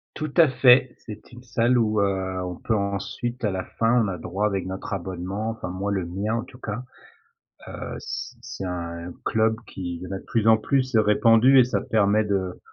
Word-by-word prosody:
Tout 155 -2 -4
à 165 - +8
fait, 125 -1 +5
c'est 105 -1 -11
une 120 +1 -13
salle 120 +1 +2
où, 110 -3 +2
heu, 95 -2 -1
on 90 0 -4
peut 110 - -1
ensuite 100 +5 -3
à 105 - +1
la 95 -1 -3
fin, 115 +2 +3
on - - -1
a 95 -2 -3
droit 100 +5 -1
avec 95 -3 -2
notre 95 +2 -5
abonnement. 95 +3 -3
Enfin 110 -5 -6
moi, 95 +3 -3
le 95 -3 -1
mien 100 +5 -2
en 115 - -2
tout 125 - -14
cas, 115 -1 -5 0.8
heu, - - -6
c - - -6
c'est 95 - -7
un 85 -1 -5
club 110 0 +2
qui 90 -3 -5
il - - -13
y 90 - -6
en - - -9
a 95 - -2
de - - -16
plus 115 -1 0
en 110 0 +7
plus 130 +2 0
répandu 115 +4 +5
et - - +8
ça 105 -5 -1
permet 105 0 +2
de, 95 -3 -2
105 Hz, 215 wpm, -24 LUFS, 95-115 Hz, 0.8 s, à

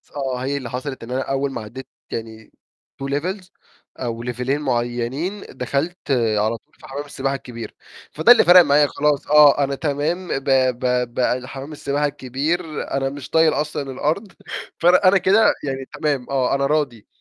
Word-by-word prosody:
آه، 135 -3 -2
هي 140 +1 -1
اللي 125 -4 -6
حصلت 130 0 -5
إن 120 - -8
أنا 130 +1 0
أول 135 +1 -1
ما 115 - -5
عدِّيت 130 +5 -9 0.2
يعني 110 -1 -7 0.5
two - - -2
levels 180 +7 -3 0.5
أو 115 -2 -4
ليفيلين 125 +4 -2
معينين 125 - -2
دخَلت 140 +7 -2 0.4
على 110 +2 +1
طول - - -37
في - - -15
حمَّام 145 +2 -5
السباحة 135 -1 -2
الكبير، 115 -4 -8 0.4
فده 160 +10 +5
اللي 245 - +8
فَرّق 175 +1 +9
معايا 145 -2 +4
خلاص 145 0 0
آه 145 -1 +6
أنا 140 0 -1
تمام 155 +5 -2
ب 135 - -2 0.4
ب 125 -2 0
ب 125 0 0
حمَّام 135 +3 -8
السباحة 145 0 -1
الكبير 145 +6 -2 0.3
أنا 135 0 0
مش 140 -1 -8
طايل 160 -1 +4
أصلًا 145 -2 -3
الأرض 160 +10 -2 0.5
ف - - -4
أنا 185 +2 +6
كده 200 +4 +4
يعني 135 -2 -3
تمام 145 -5 -1
آه 135 -1 +1
أنا 140 - +1
راضي،. 140 -7 -1
140 Hz, 170 wpm, -21 LUFS, 125-150 Hz, 0.5 s, فَرّق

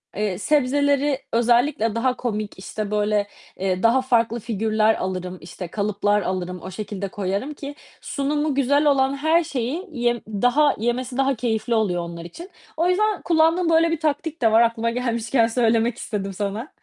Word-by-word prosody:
eee, 205 -3 -1
sebzeleri 285 +2 +2
özellikle 235 -1 +2
daha 250 +2 0
komik, 215 -4 -3
işte, 205 +2 -5
böyle, 210 -1 +1 0.3
eee, 185 -1 -1
daha 235 +3 +4
farklı 235 -2 +1
figürler 220 0 +1
alırım, 185 -1 -4
işte, 180 +2 -8
kalıplar 205 +2 0
alırım. 180 -1 -3
O 185 - -8
şekilde 200 0 -5
koyarım 200 +9 -3
ki 285 0 -8 0.3
sunumu 295 +1 -1
güzel 285 +2 +2
olan 270 -1 +3
her 320 +4 +3
şeyi 285 - -3
yem 240 -4 0
daha 245 +8 +2
yemesi 245 +3 -2
daha 270 0 +2
keyifli 230 0 -1
oluyor 190 -6 +1
onlar 170 0 -8
için. 335 - -10 0.3
O 335 +3 +2
yüzden 420 +2 +1
kullandığım 330 +1 +2
böyle 330 0 +4
bir 330 - -1
taktik 310 0 -2
de 225 -2 +4
var 225 +1 +6
aklıma 230 0 +1
gelmişken 235 0 +1
söylemek 230 0 +1
istedim 195 -2 -4
sana. 205 +7 -4
235 Hz, 160 wpm, -22 LUFS, 210-280 Hz, 0.3 s, var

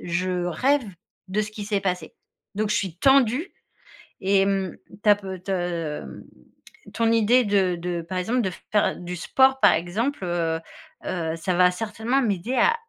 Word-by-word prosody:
je 180 +1 -1
rêve 265 - +1 0.4
de 195 +3 -1
ce 210 - -6
qui 215 -1 -7
s'est 205 -1 0
passé. 180 -2 -3 0.4
Donc 210 +1 -1
je 210 - +2
suis 190 -5 -2
tendue 270 - +3 0.7
et 195 +1 +3
hem, 195 -2 0 0.3
tu 210 - +2
as 205 - +8
pe 190 -2 -7
te 185 +3 -12
hem, 170 - -4 0.7
ton 230 0 +2
idée 230 +3 +4
de 195 -3 +2
de, 170 0 -3
par 185 +3 -5
exemple, 225 +8 0
de 190 -4 -1 0.2
faire 210 -1 +2
du 180 0 -6
sport, 265 +9 +3
par - - +7
exemple, 200 - -2
heu 165 -2 -1 0.5
heu, 165 -3 -2
ça 180 +3 -1
va 180 +1 +5
certainement 225 +7 -1
m'aider 220 +1 -1
à 465 - +4
195 Hz, 170 wpm, -24 LUFS, 180-225 Hz, 0.7 s, as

